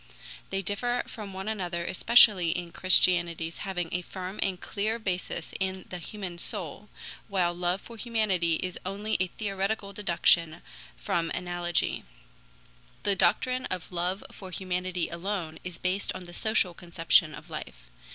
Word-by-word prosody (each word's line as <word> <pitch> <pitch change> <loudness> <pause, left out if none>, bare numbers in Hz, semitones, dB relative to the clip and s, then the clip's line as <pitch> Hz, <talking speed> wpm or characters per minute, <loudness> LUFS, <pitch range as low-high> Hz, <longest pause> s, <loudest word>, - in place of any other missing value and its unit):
They 195 0 -1
differ 240 +6 0
from 210 -4 -7
one 190 +1 -6
another 180 -5 -2
especially 195 -3 +6
in 175 0 -2
Christianity's 175 -3 +3
having 185 -4 -2
a 180 - 0
firm 185 +2 -6
and 185 -2 0
clear 215 +4 -1
basis 180 -5 -3
in 190 -1 -2
the 180 - -5
human 180 -1 -6
soul, - - -6 0.4
while 180 -4 +1
love 175 +2 0
for 235 - -11
humanity 210 -8 +1
is 185 -1 -4
only 205 +3 -2
a 185 - +2
theoretical 200 +1 -2
deduction 170 -4 +3 0.3
from 165 - 0
analogy. 175 -1 0 1.0
The 200 - +3
doctrine 255 +6 +2
of 185 -1 -4
love 180 +2 -1
for 190 - -9
humanity 180 -1 -1
alone 170 -2 -3
is 180 -2 -6
based 185 +2 0
on 185 - -7
the 175 0 -11
social 215 -3 +1
conception 170 -2 +3
of - - -12
life. - - -8
185 Hz, 145 wpm, -29 LUFS, 175-200 Hz, 1.0 s, especially